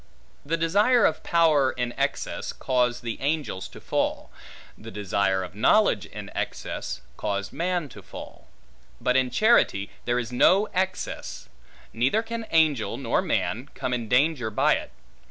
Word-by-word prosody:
The 165 +3 -1
desire 205 +9 +4
of 160 - +1
power 155 -6 +3
in 120 -1 -3
excess, - - -2
caused 125 -1 0
the 115 -1 -5
angels 145 -9 -2
to - - -13
fall; - - -2 0.4
the 110 - -11
desire 100 -2 0
of 90 0 -8
knowledge 110 - +3
in - - -9
excess, - - -4 0.2
caused 100 0 -3
man 170 +1 -1
to - - -12
fall: - - -11 0.5
but 125 - +1
in 130 -1 +3
charity 125 - +3
there 120 0 +1
is 120 -1 -3
no 190 +11 +4
excess; 185 - -3 0.4
neither 130 - +1
can 230 -1 -5
angel, 155 -8 +2
nor - - 0
man, 125 +6 -1
come 130 -1 -2
in 120 -3 -3
danger 125 -2 +2
by 105 - +3
it. - - -4
130 Hz, 150 wpm, -25 LUFS, 115-165 Hz, 0.5 s, desire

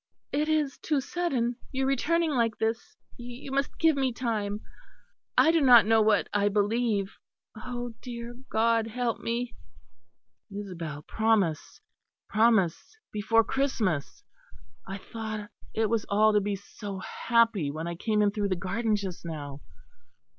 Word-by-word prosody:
It 300 +2 0
is 300 -3 0
too 300 -3 0
sudden, 265 -6 -1
your 265 0 0
returning 315 +5 +1
like 230 -4 +1
this. 225 +1 -2 0.2
You 245 +2 -8
must 275 0 -1
give 325 -2 +4
me 265 -2 +1
time. 215 -4 -2 0.8
I 320 - +6
do 330 -1 +3
not 245 -5 +8
know 225 0 +4
what 215 -1 +3
I 205 0 +3
believe. 205 -1 0 0.4
Oh, 245 -1 -5
dear 235 -1 -6 0.2
God, 225 0 +2
help 235 0 -2
me." 235 +1 -2 1.0
"Isabel, 170 -7 -6
promise! 215 -8 0 0.5
promise! 220 - +2
Before 225 +2 +3
Christmas! 230 - -1 0.6
I 195 0 -4
thought 220 0 -6 0.2
it 220 0 +2
was 225 -1 -1
all 215 +2 +4
to 210 - +4
be 200 0 -1
so 200 0 -8
happy, 230 -4 +1
when 155 +3 -4
I 170 - -3
came 210 +4 +1
in 205 - +3
through 205 -1 -1
the 185 - +1
garden 215 +5 0
just 195 -4 -5
now. 145 -4 -6
225 Hz, 140 wpm, -28 LUFS, 200-245 Hz, 1.0 s, not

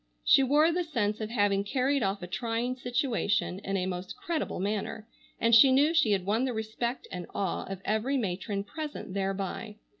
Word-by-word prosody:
She - - +6
wore 295 +5 +4
the 355 +1 0
sense 225 -10 -1
of 215 - -3
having 205 -3 +2
carried 265 +5 +1
off 195 -2 -1
a - - -5
trying 230 +5 -2
situation 245 -7 0
in 195 -1 -2
a 185 - -1
most 185 +1 -5
creditable 325 - -3
manner, 210 +2 -3 0.3
and 230 +1 +2
she 260 +4 +8
knew 290 +5 +4
she 315 -9 +4
had 195 -3 +1
won 215 +5 +1
the 255 - -1
respect 220 +3 -3
and 180 -2 -6
awe 195 -3 -1
of 195 -1 -6
every 225 +6 0
matron 200 -2 -2
present 300 -3 -6
thereby. 195 +2 -3
220 Hz, 185 wpm, -29 LUFS, 195-255 Hz, 0.3 s, she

